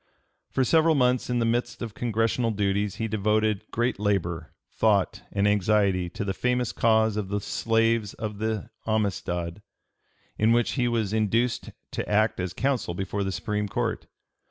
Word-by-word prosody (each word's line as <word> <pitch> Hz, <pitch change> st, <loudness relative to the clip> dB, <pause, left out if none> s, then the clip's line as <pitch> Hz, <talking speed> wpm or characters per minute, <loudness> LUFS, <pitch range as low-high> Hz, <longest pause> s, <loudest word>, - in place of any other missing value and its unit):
For 130 Hz, -, +1 dB
several 160 Hz, +4 st, +4 dB
months 125 Hz, -2 st, +2 dB
in 125 Hz, -, +1 dB
the 115 Hz, -, +2 dB
midst 120 Hz, +1 st, -1 dB
of 115 Hz, -3 st, -5 dB
Congressional 115 Hz, +1 st, 0 dB
duties 100 Hz, -1 st, 0 dB
he 115 Hz, -, -2 dB
devoted 110 Hz, 0 st, 0 dB
great 120 Hz, -2 st, -1 dB
labor, 85 Hz, -6 st, -1 dB, 0.2 s
thought, 105 Hz, -4 st, +2 dB
and 100 Hz, 0 st, +1 dB
anxiety 100 Hz, -3 st, +2 dB
to 100 Hz, -, -5 dB
the 95 Hz, -, -1 dB
famous 125 Hz, +3 st, 0 dB
cause 110 Hz, -2 st, +2 dB
of 100 Hz, -3 st, -3 dB
the 105 Hz, +1 st, 0 dB
slaves 115 Hz, 0 st, +1 dB
of 105 Hz, -2 st, -5 dB
the 110 Hz, -2 st, -2 dB, 0.2 s
Amistad, 95 Hz, -4 st, -1 dB, 0.8 s
in 110 Hz, +2 st, +4 dB
which 120 Hz, 0 st, +2 dB
he 125 Hz, -3 st, +1 dB
was 110 Hz, -4 st, 0 dB
induced 115 Hz, +3 st, +1 dB, 0.2 s
to -, -, -4 dB
act 105 Hz, 0 st, +2 dB
as 90 Hz, -1 st, -2 dB
counsel 125 Hz, -4 st, -1 dB
before 95 Hz, +2 st, -2 dB
the 95 Hz, -, -2 dB
Supreme 105 Hz, +1 st, -2 dB
Court. -, -, -2 dB
110 Hz, 160 wpm, -26 LUFS, 100-115 Hz, 0.8 s, several